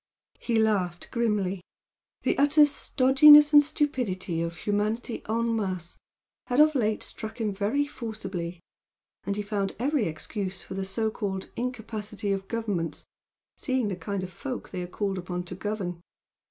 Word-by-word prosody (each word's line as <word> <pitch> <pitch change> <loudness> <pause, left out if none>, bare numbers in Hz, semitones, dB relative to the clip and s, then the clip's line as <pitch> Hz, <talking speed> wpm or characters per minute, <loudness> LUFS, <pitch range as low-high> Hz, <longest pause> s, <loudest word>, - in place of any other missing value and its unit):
He 235 -2 0
laughed 195 -6 0
grimly, 210 -6 0 0.6
the - - +2
utter 290 +1 +6
stodginess 295 +2 +6
and 295 - +10
stupidity 235 - -1
of 170 +1 -3
humanity 215 +3 -1
EN 230 +1 +1
MASSE 185 -5 -3 0.5
had 250 +2 +1
of 310 +1 +6
late 220 -6 0
struck 220 +2 -6
him 215 -3 -1
very 215 +9 0
forcibly, 190 -10 -6 0.6
and 200 - -1
he 210 - -2
found 200 -2 -2
every 265 -2 +1
excuse 190 +4 -5
for - - -8
the 195 0 -3
so 220 +3 -1
called 190 -3 -4
incapacity 220 -4 -4
of 195 0 -2
Governments, 205 -8 -3 0.5
seeing 260 -6 0
the 190 - -2
kind 185 +2 -4
of 185 - -6
folk 255 +6 -6
they 180 - -4
are 175 - -4
called 195 +1 -2
upon 180 0 -4
to 175 - -8
govern. 185 -3 -4
210 Hz, 155 wpm, -27 LUFS, 190-240 Hz, 0.6 s, and